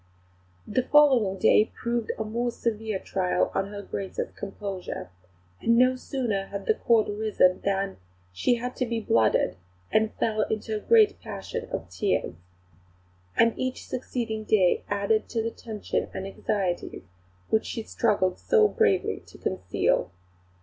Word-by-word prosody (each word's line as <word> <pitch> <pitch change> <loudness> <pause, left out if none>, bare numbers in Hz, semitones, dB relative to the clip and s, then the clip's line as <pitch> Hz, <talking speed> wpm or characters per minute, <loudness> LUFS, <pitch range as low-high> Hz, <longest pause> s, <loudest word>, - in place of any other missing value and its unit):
The 255 - +1
following 260 -8 +4
day 210 - +5
proved 235 -2 -1
a 220 - -1
much 215 0 -8
more 240 +1 0
severe 220 -3 -2
test - - -16
to 195 - -1 0.3
her 200 +1 -2
Grace's 195 -1 -4
composure; 195 - -6 0.5
and 230 0 +3
no 255 +1 +5
sooner 235 -7 -2
had 200 -1 -6
the - - +4
Court 225 0 +3
risen 205 -3 +2
than 195 0 -1 0.4
"she 240 - +2
had 250 +1 -4
to 255 - 0
be 230 -1 -1
blooded, 110 - +2 0.3
and 220 0 +3
fell 215 -1 0
into 220 0 -2
a - - -1
great 430 - +4
passion 475 -1 -6
of - - -4
tears." 200 - 0 1.0
And 230 -1 +5
each 255 0 -3
succeeding 235 -3 -3
day 195 -5 +3
added 205 +2 +1
to 225 -2 -1
the 230 - -2
tension 220 -3 -4
and 190 - -4
anxieties 195 - -2 0.5
which 220 - +1
she 225 - -4
struggled 200 -5 +1
so 440 -3 +4
bravely 425 -1 +1
to - - -14
conceal. 140 - 0
220 Hz, 150 wpm, -26 LUFS, 200-245 Hz, 1.0 s, day